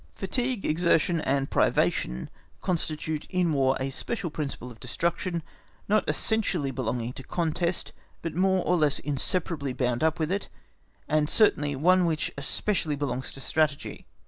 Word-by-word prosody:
Fatigue, 245 Hz, +3 st, -1 dB
exertion, 170 Hz, +1 st, +3 dB
and 135 Hz, -1 st, 0 dB
privation 60 Hz, +1 st, +1 dB, 0.3 s
constitute 160 Hz, -3 st, -2 dB
in 180 Hz, -3 st, +1 dB
War 135 Hz, -2 st, +3 dB
a 135 Hz, +1 st, -2 dB
special 180 Hz, -, -3 dB
principle 140 Hz, -5 st, -4 dB
of 115 Hz, -, -14 dB
destruction, 170 Hz, +6 st, -2 dB, 0.4 s
not 210 Hz, +1 st, +2 dB
essentially 190 Hz, -10 st, +1 dB
belonging 125 Hz, -1 st, -2 dB
to 135 Hz, -, -9 dB
contest, 170 Hz, +3 st, -1 dB, 0.3 s
but 165 Hz, -, -3 dB
more 190 Hz, +1 st, +2 dB
or 180 Hz, -, +3 dB
less 150 Hz, -3 st, +3 dB
inseparably 145 Hz, 0 st, -1 dB
bound 125 Hz, +1 st, 0 dB
up 160 Hz, 0 st, +2 dB
with 160 Hz, +1 st, -1 dB
it, 200 Hz, +1 st, -2 dB, 0.6 s
and 155 Hz, 0 st, +2 dB
certainly 145 Hz, -10 st, +3 dB
one 180 Hz, +6 st, +4 dB
which 160 Hz, -2 st, 0 dB
especially 155 Hz, +3 st, 0 dB
belongs 135 Hz, -3 st, -3 dB
to 135 Hz, -, -10 dB
Strategy. 155 Hz, -1 st, -1 dB
155 Hz, 145 wpm, -27 LUFS, 135-180 Hz, 0.6 s, one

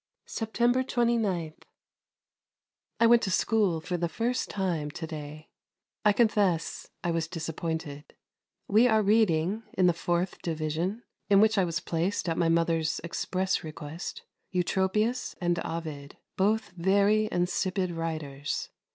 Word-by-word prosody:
September 240 Hz, +3 st, +1 dB
29. 225 Hz, -10 st, 0 dB, 1.5 s
I 230 Hz, -, +5 dB
went 235 Hz, 0 st, +6 dB
to -, -, -1 dB
school 195 Hz, -3 st, +2 dB
for 175 Hz, +2 st, -3 dB
the 170 Hz, 0 st, -1 dB
first 240 Hz, +7 st, -1 dB
time 175 Hz, -7 st, -1 dB
to 160 Hz, +2 st, -6 dB
day. 155 Hz, -1 st, -8 dB, 0.5 s
I 210 Hz, -, +6 dB
confess 205 Hz, -6 st, +1 dB
I 175 Hz, -, 0 dB
was 165 Hz, -1 st, -1 dB
disappointed. 160 Hz, -3 st, -5 dB, 0.5 s
We 220 Hz, +5 st, +5 dB
are 220 Hz, -2 st, +3 dB
reading, 200 Hz, -2 st, +2 dB
in 185 Hz, -, +2 dB
the 175 Hz, -, +5 dB
Fourth 175 Hz, +2 st, -1 dB
Division, 165 Hz, +7 st, -2 dB, 0.3 s
in 200 Hz, -1 st, +6 dB
which 220 Hz, +1 st, +5 dB
I 195 Hz, -3 st, +3 dB
was 165 Hz, 0 st, -2 dB
placed 175 Hz, +4 st, -1 dB
at 165 Hz, -, 0 dB
my 165 Hz, -, +3 dB
mother's 165 Hz, -2 st, +1 dB
express 185 Hz, +2 st, -1 dB
request, 155 Hz, +2 st, -7 dB, 0.3 s
Eutropius 190 Hz, +6 st, 0 dB
and 175 Hz, -1 st, +1 dB
Ovid; 155 Hz, -4 st, -6 dB, 0.2 s
both 210 Hz, +2 st, +1 dB
very 200 Hz, +4 st, +2 dB
insipid 185 Hz, +1 st, 0 dB
writers. 155 Hz, -4 st, -4 dB
180 Hz, 130 wpm, -28 LUFS, 165-210 Hz, 1.5 s, went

